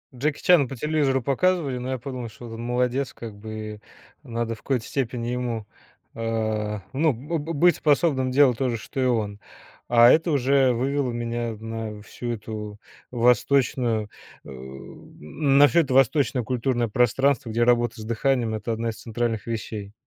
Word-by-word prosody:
Джеки 145 Hz, +4 st, -1 dB
Чана 165 Hz, -8 st, +5 dB
по 135 Hz, -, -7 dB
телевизору 140 Hz, -1 st, +1 dB
показывали, 140 Hz, 0 st, +1 dB
но 125 Hz, +1 st, -5 dB
я 130 Hz, -, -1 dB
подумал, 125 Hz, -3 st, -6 dB
что 120 Hz, -, -12 dB
вот 115 Hz, -, -8 dB
он, 115 Hz, -, -7 dB
молодец 125 Hz, +2 st, -1 dB
как 110 Hz, -3 st, -9 dB
бы, 110 Hz, 0 st, -7 dB, 0.4 s
надо 115 Hz, -2 st, -3 dB
в -, -, -20 dB
какой-то 130 Hz, -5 st, -1 dB
степени 120 Hz, -3 st, -3 dB
ему 120 Hz, -3 st, -3 dB, 0.5 s
э, 110 Hz, -2 st, -2 dB
ну, 150 Hz, +1 st, +2 dB
б 150 Hz, +8 st, -4 dB
б 160 Hz, +3 st, -4 dB
быть 175 Hz, +4 st, +4 dB
способным 140 Hz, -4 st, +2 dB
делать 130 Hz, -3 st, +4 dB
то 130 Hz, -2 st, 0 dB
же, 115 Hz, -, -2 dB
что 135 Hz, -, -7 dB
и -, -, +2 dB
он. 105 Hz, -4 st, 0 dB, 0.5 s
А 120 Hz, 0 st, +7 dB
это 165 Hz, +1 st, +3 dB
уже 135 Hz, -1 st, +3 dB
вывело 135 Hz, +1 st, -1 dB
меня 120 Hz, 0 st, -3 dB
на 110 Hz, -2 st, -6 dB
всю 120 Hz, +3 st, -6 dB
эту 105 Hz, -1 st, -6 dB, 0.3 s
восточную 120 Hz, -2 st, +2 dB, 0.4 s
э, -, -, -11 dB
на 75 Hz, -, 0 dB
всё 170 Hz, +2 st, +4 dB
это 135 Hz, -4 st, -2 dB
восточное 130 Hz, -1 st, +3 dB
культурное 120 Hz, 0 st, 0 dB
пространство, 125 Hz, +2 st, +2 dB
где 120 Hz, +1 st, +1 dB
работа 120 Hz, -2 st, +2 dB
с -, -, -6 dB
дыханием- 115 Hz, 0 st, 0 dB
это 110 Hz, +2 st, -3 dB
одна 115 Hz, +1 st, -2 dB
из 110 Hz, -, -5 dB
центральных 115 Hz, -1 st, -2 dB
вещей. 110 Hz, -3 st, -5 dB
120 Hz, 165 wpm, -24 LUFS, 115-135 Hz, 0.5 s, А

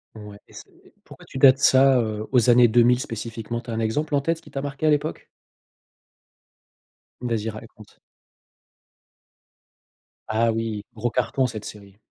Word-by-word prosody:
Ouais 105 Hz, -1 st, -11 dB
et -, -, -22 dB
s -, -, -10 dB, 0.2 s
et -, -, -22 dB
pourquoi -, -, -15 dB
tu -, -, -10 dB
dates 130 Hz, 0 st, +6 dB
ça, 135 Hz, -1 st, +5 dB
heu, 110 Hz, -1 st, -4 dB
aux 125 Hz, -1 st, +3 dB
années 120 Hz, 0 st, +6 dB
2000 120 Hz, +2 st, +4 dB
spécifiquement 115 Hz, -1 st, -6 dB
tu 120 Hz, -, -14 dB
as 115 Hz, -, -3 dB
un 110 Hz, -, -3 dB
exemple 145 Hz, +7 st, -1 dB
en 140 Hz, -, +1 dB
tête 165 Hz, +2 st, -2 dB
qui -, -, -17 dB
t'a 135 Hz, -, -4 dB
marqué 140 Hz, +2 st, -5 dB
à -, -, +5 dB
l'époque? 150 Hz, +1 st, -1 dB, 2.0 s
Vas-y, 115 Hz, -2 st, -2 dB
raconte. 110 Hz, -1 st, -13 dB, 2.3 s
Ah 115 Hz, +1 st, +1 dB
oui, 110 Hz, -2 st, -4 dB
gros 120 Hz, +2 st, -2 dB
carton 130 Hz, +2 st, 0 dB
cette 110 Hz, -3 st, -8 dB
série. 100 Hz, -1 st, -12 dB
120 Hz, 160 wpm, -23 LUFS, 110-130 Hz, 2.3 s, dates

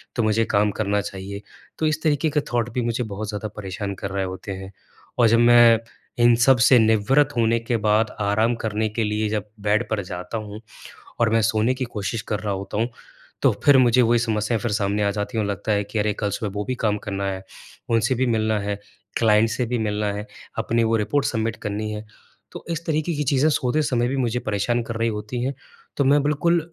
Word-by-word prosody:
तो 120 Hz, -, +1 dB
मुझे 110 Hz, +1 st, +2 dB
काम 105 Hz, 0 st, +2 dB
करना 105 Hz, -1 st, 0 dB
चाहिए। 100 Hz, +1 st, -7 dB, 0.4 s
तो 160 Hz, -, +1 dB
इस 155 Hz, 0 st, -1 dB
तरीके 155 Hz, 0 st, +2 dB
का 150 Hz, -, +1 dB
थॉट 120 Hz, 0 st, +1 dB
भी 125 Hz, -, 0 dB
मुझे 120 Hz, +1 st, -1 dB
बहुत 105 Hz, 0 st, -5 dB
ज़्यादा 105 Hz, +1 st, -4 dB
परेशान 100 Hz, 0 st, -4 dB
कर 95 Hz, +1 st, -5 dB
रहे 100 Hz, -1 st, -1 dB
होते 95 Hz, +2 st, -6 dB
हैं। 95 Hz, +1 st, -8 dB, 0.5 s
और 115 Hz, -, +6 dB
जब 115 Hz, +1 st, +4 dB
मैं 120 Hz, -1 st, +7 dB, 0.4 s
इन 120 Hz, 0 st, +6 dB
सब 125 Hz, +2 st, +5 dB
से 125 Hz, -3 st, +7 dB
निवृत 110 Hz, +7 st, +3 dB
होने 115 Hz, 0 st, +3 dB
के 115 Hz, 0 st, -1 dB
बाद 105 Hz, +1 st, +2 dB
आराम 110 Hz, +4 st, +2 dB
करने 110 Hz, 0 st, -1 dB
के 110 Hz, +1 st, -2 dB
लिए 105 Hz, +1 st, 0 dB
जब 105 Hz, -1 st, -2 dB, 0.2 s
बेड 105 Hz, +3 st, +1 dB
पर 110 Hz, -2 st, -1 dB
जाता 90 Hz, +4 st, -5 dB
हूँ 105 Hz, 0 st, -7 dB, 0.6 s
और 115 Hz, -2 st, +3 dB
मैं 115 Hz, 0 st, +3 dB
सोने 110 Hz, +4 st, +2 dB
की 130 Hz, -, -3 dB
कोशिश 110 Hz, -1 st, -4 dB
कर 105 Hz, -, -1 dB
रहा 105 Hz, -2 st, -2 dB
होता 100 Hz, +2 st, -5 dB
हूँ, 115 Hz, +2 st, +1 dB, 0.5 s
तो -, -, +5 dB
फिर 140 Hz, -2 st, +7 dB
मुझे 125 Hz, 0 st, +5 dB
वही 120 Hz, 0 st, +3 dB
समस्या 110 Hz, 0 st, 0 dB
फिर 110 Hz, +1 st, -2 dB
सामने 105 Hz, 0 st, 0 dB
आ 100 Hz, -, +2 dB
जाती 105 Hz, +3 st, -3 dB
और 105 Hz, -, +1 dB
लगता 100 Hz, +2 st, -2 dB
है 100 Hz, 0 st, +1 dB
कि 110 Hz, -, -4 dB
अरे 105 Hz, 0 st, +1 dB
कल 105 Hz, -1 st, 0 dB
सुबह 105 Hz, -1 st, -3 dB
वो 105 Hz, -, -2 dB
भी 130 Hz, -, -2 dB
काम 105 Hz, -1 st, +2 dB
करना 100 Hz, -1 st, -2 dB
है, 95 Hz, 0 st, -6 dB, 0.5 s
उनसे 115 Hz, +3 st, +2 dB
भी 130 Hz, +1 st, +1 dB
मिलना 110 Hz, -2 st, +1 dB
है, 100 Hz, 0 st, -3 dB, 0.4 s
क्लाइंट 110 Hz, 0 st, +4 dB
से 125 Hz, +1 st, -1 dB
भी 120 Hz, 0 st, -1 dB
मिलना 105 Hz, -1 st, -1 dB
है, 105 Hz, +1 st, -5 dB, 0.3 s
अपनी 115 Hz, 0 st, +1 dB
वो 115 Hz, 0 st, +2 dB
रिपोर्ट 135 Hz, +7 st, 0 dB
सबमिट 115 Hz, -1 st, -1 dB
करनी 105 Hz, +1 st, -3 dB
है। 105 Hz, +1 st, -6 dB, 0.5 s
तो -, -, -9 dB
इस 165 Hz, 0 st, -3 dB
तरीके 155 Hz, +1 st, 0 dB
की 150 Hz, -, -1 dB
चीज़ें 140 Hz, +3 st, +3 dB
सोते 130 Hz, +2 st, +1 dB
समय 120 Hz, -4 st, 0 dB
भी 135 Hz, -, -2 dB
मुझे 125 Hz, -1 st, 0 dB
परेशान 120 Hz, +2 st, -1 dB
कर 115 Hz, 0 st, -6 dB
रही 115 Hz, +1 st, +1 dB
होती 110 Hz, +3 st, -4 dB
हैं, 135 Hz, -, -1 dB, 0.4 s
तो 140 Hz, -, +2 dB
मैं 145 Hz, +1 st, +4 dB
बिल्कुल 170 Hz, +4 st, +2 dB
110 Hz, 225 wpm, -23 LUFS, 105-120 Hz, 0.6 s, मैं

